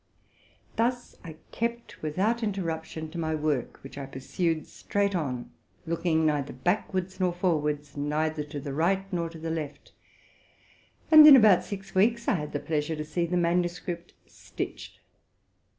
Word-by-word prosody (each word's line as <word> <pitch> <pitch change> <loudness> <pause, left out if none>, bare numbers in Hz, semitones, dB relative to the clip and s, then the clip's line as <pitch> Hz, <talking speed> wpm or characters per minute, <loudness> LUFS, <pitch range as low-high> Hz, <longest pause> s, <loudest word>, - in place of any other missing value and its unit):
Thus 245 +2 -1
I 160 -2 -8 0.2
kept, 235 +1 -4
without 195 +10 0
interruption, 165 -6 -3
to 170 - -5
my 160 -1 -1
work, 150 -5 -1
which 135 +1 -9
I 135 - -6
pur 135 - -10
sued 165 +3 -1
straight 200 -1 -1
on, 130 -8 -3 0.3
looking 165 -1 +1
neither 145 -2 0
backward 185 - -1
nor 185 -1 +2
forward, 150 -5 0
neither 150 +1 -1
to 145 0 -6
the 140 0 -5
right 185 +6 +1
nor 170 -1 -1
to 165 - -11
the 160 0 -4
left; 155 -3 -5 1.2
and 310 -1 +11
in 290 - +12
about 215 -7 +6
six 200 -1 -8
weeks 235 +5 +2
I - - +4
had 150 -5 -3
the 145 - -2
pleasure 155 +1 -2
to 150 0 -5
see 170 +3 -1
the 180 +1 0
manuscript 175 0 -1
stitched. - - -7
165 Hz, 155 wpm, -27 LUFS, 150-190 Hz, 1.2 s, in